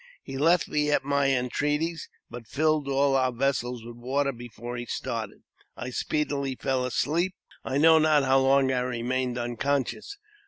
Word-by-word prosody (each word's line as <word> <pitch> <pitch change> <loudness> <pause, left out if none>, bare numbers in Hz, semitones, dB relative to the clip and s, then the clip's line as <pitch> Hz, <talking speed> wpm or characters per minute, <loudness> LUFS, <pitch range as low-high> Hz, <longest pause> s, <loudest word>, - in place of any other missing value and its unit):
He 135 - -8
left 165 +5 +3
me 150 0 0
at 145 - +2
my 140 0 +1
entreaties, 150 +5 -1 0.2
but 120 -2 -10
filled 155 +1 +1
all 140 0 +2
our 130 -1 +2
vessels 125 -2 -1
with, 120 0 -9
water 140 +3 0
before 120 -1 -8
he 120 0 -5
started. - - -4 0.3
I 125 - -5
speedily 140 -1 -1
fell 130 0 -1
asleep, 170 +9 0 0.3
and 130 - -3
I - - +3
know 160 +2 +6
not 155 -2 +4
how 135 0 +4
long 135 0 +3
I 130 - +1
remained 125 0 -2
unconscious. 135 - -2
135 Hz, 165 wpm, -27 LUFS, 125-150 Hz, 0.3 s, know